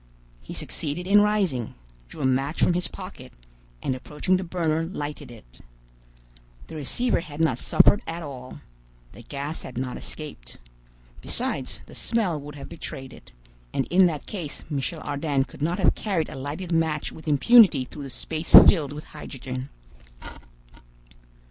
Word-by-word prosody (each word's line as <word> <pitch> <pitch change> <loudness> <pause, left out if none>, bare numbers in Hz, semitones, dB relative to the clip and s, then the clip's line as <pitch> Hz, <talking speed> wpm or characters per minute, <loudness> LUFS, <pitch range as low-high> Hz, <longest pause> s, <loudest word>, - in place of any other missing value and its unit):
He - - -9
succeeded 160 +4 -4
in 205 +2 +6
rising, 195 - +1 0.3
drew - - -9
a - - +1
match 135 +4 +1
from - - +4
his 180 +1 0
pocket, 185 -10 -10 0.5
and 130 - 0
approaching 150 +8 0
the 190 - -3
burner 165 -3 0
lighted 150 -5 -5
it. 60 - -15 1.0
The - - -10
receiver 230 - 0
had 155 -3 -9
not 135 -7 +2
suffered 205 - +5
at 165 +1 -4
all. 130 -3 -8 0.5
The - - -12
gas 140 +5 -5
had 125 - -9
not 125 0 -3
escaped. 150 - -8 0.6
Besides, - - -1
the - - -14
smell 195 -10 -1
would 145 +1 -9
have 140 - -8
betrayed 135 -4 -7
it; - - -15 0.4
and 135 - 0
in 185 +1 +6
that 155 -4 -4
case 170 -8 -6
Michel 145 +3 -2
Ardan 145 -1 0
could 135 - -13
not 170 +4 0
have - - +4
carried 190 -7 -1
a - - -8
lighted 145 +7 -5
match 160 -2 +1
with 160 - -12
impunity 170 - +6
through 145 - -10
the 140 - -6
space 160 +5 -5
filled 145 -6 +3
with 150 +1 -7
hydrogen. 130 -3 -7
150 Hz, 155 wpm, -25 LUFS, 135-175 Hz, 1.0 s, in